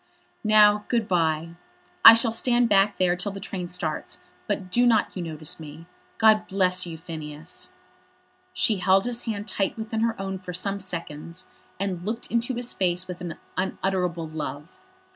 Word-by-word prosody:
"Now, 210 -1 +5
good 230 -4 0
bye. 165 -2 +1 0.5
I 225 - +12
shall 230 0 +3
stand 240 +1 +2
back 200 0 +3
there 180 -1 +2
till 180 +3 -2
the 195 - -7
train 190 -3 -5
starts, 175 -4 -4 0.3
but 195 -3 -3
do 245 +4 +4
not 220 -3 +2
you 185 - -4
notice 160 -1 -3
me. 155 +1 -10 0.3
God 215 -1 +4
bless 185 -2 +1
you, 165 -1 -7
Phineas." 155 -1 -8 0.8
She 215 - +2
held 190 +1 +3
his 240 -1 -2
hand 210 -3 -4
tight 195 +1 -1
within 220 0 -4
her 230 -2 0
own 195 -1 -4
for 180 -1 -8
some 200 +3 -1
seconds, 165 - -6 0.3
and 190 -3 -3
looked 220 +4 -4
into 235 +2 0
his 245 0 -1
face 180 -1 0
with 180 -1 -7
an 175 -3 -6 0.2
unutterable 180 -3 -2
love. 150 -2 -6
190 Hz, 165 wpm, -25 LUFS, 170-215 Hz, 0.8 s, I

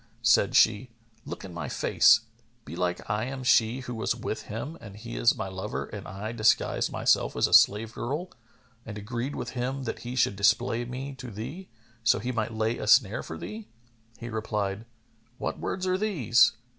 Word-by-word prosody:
Said 115 -4 +4
she, 110 +3 +4 0.4
"Look - - -7
in 90 - -9
my 85 - -5
face, 110 - +4 0.4
belike 90 +1 -3
I 105 +2 -1
am 130 0 -5
she 120 0 +3
who 125 -1 -6
was 110 - -1
with - - -5
him 125 +9 -5
and 100 -1 -10
he 115 +2 -8
is 120 - +3
my - - -3
lover 95 0 -4
and - - -8
I 100 +4 -5
disguised 115 -1 +2
myself - - +2
as - - +3
a - - -1
slave 110 +2 +5
girl 150 +9 -4 0.5
and 105 -2 -8
agreed 120 +6 -4
with - - -5
him 130 +2 -3
that 115 - -4
he 125 +1 -6
should 115 -5 +2
display 115 +4 +2
me 130 +3 -6
to 125 - -7
thee, 130 - -7 0.3
so 110 - +4
he 125 +5 -3
might 115 -2 -2
lay 110 +1 -1
a 105 - -4
snare 105 0 +4
for - - -7
thee." 215 0 -8 0.5
He 120 - -7
replied, 105 -1 -3 0.5
"What - - -4
words 185 0 -3
are 185 0 +1
these? 145 - +3
115 Hz, 185 wpm, -27 LUFS, 105-130 Hz, 0.5 s, slave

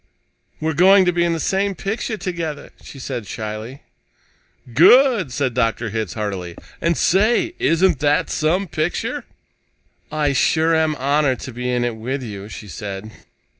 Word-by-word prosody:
"We're 160 +1 -1
going 190 +4 +6
to 180 - +3
be 170 0 +2
in 170 -1 +1
the 165 - -2
same 195 +3 0
picture 220 +4 -3
together," 170 -6 -5
she - - -11
said 125 -5 -5
shyly. 110 +4 -6 0.9
"Good!" 215 - +5
said 130 -1 -1
Dr. 115 -2 0
Hitz 110 -4 -3
heartily. 95 -5 -4 0.3
"And, 170 -1 +1
say, 220 - +2
isn't 165 -3 +2
that 150 0 +1
some 180 +6 0
picture?" 155 +1 -2 0.9
"I 150 -2 0
sure 160 +5 +2
am 160 -1 +1
honored 140 -1 +1
to 130 - -7
be 125 +1 -3
in 125 -1 0
it 120 -2 -2
with 130 +4 -4
you," 100 -3 -7
she 105 - -9
said. 100 +1 -7
145 Hz, 155 wpm, -20 LUFS, 115-170 Hz, 0.9 s, going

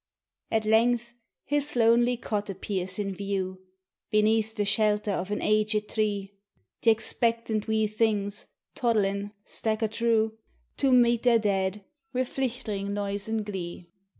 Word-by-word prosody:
At 220 -1 +1
length 235 +2 +3 0.3
his 290 0 0
lonely 240 +1 +4
cot 210 -3 -3
appears 190 -1 -3
in 200 -2 -2
view, 190 -1 -3 0.5
Beneath 220 0 +2
the 205 - 0
shelter 210 0 +2
of 185 0 -2
an 210 - -2
aged 215 0 +1
tree; 205 -2 -1 0.5
Th' - - -7
expectant 225 0 +1
wee 220 0 +2
things, 210 -1 0 0.3
toddlin', 205 -4 0
stacher 220 0 -1
through 220 -1 +1 0.4
To 275 -2 +2
meet 240 -2 +5
their 240 -2 +5
dad, 200 -2 0 0.3
wF 255 0 -1
Hichterin' 220 -6 -2
noise 200 +1 -3
an' 220 -1 0
glee. 180 -4 -6
215 Hz, 130 wpm, -27 LUFS, 200-230 Hz, 0.5 s, meet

